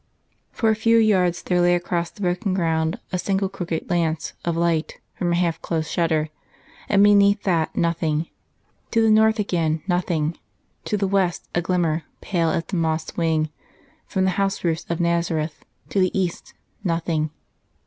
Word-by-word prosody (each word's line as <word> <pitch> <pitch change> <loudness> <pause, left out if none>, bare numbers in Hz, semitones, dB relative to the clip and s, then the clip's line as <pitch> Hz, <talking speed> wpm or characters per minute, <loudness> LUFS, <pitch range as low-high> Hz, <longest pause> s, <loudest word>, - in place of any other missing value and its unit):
For 225 -1 +2
a - - +2
few 230 +1 +3
yards 185 -6 +3
there 180 -1 +1
lay 175 0 +4
across 175 -1 -1
the - - -15
broken 185 +2 0
ground 160 -2 0
a 180 - -1
single 195 +1 0
crooked 175 -4 -4
lance 165 -3 -1
of 170 -1 -1
light 170 -2 0
from 175 -2 -1
a - - +2
half 170 -2 0
closed 160 -2 -2
shutter; 160 -2 +1 0.6
and 200 -1 +5
beneath 200 0 +5
that, 170 -5 0
nothing. 165 -2 0 0.6
To 225 -1 +2
the 220 - +4
north 220 +1 +5
again, 165 -6 0
nothing; 170 -3 0 0.5
to 210 - 0
the 200 -1 0
west 190 -3 0
a 175 - +1
glimmer, 170 -3 0 0.2
pale 170 -4 0
as 165 +1 0
a - - +2
moth's 160 -1 -1
wing, 160 -2 +1 0.6
from 190 - 0
the 190 - +2
house 195 0 -1
roofs 165 -2 -1
of 170 - -1
Nazareth; 170 -2 -1 0.3
to 200 - 0
the 185 +1 +2
east, 180 -3 -3 0.3
nothing. 165 -3 0
175 Hz, 170 wpm, -23 LUFS, 165-195 Hz, 0.6 s, and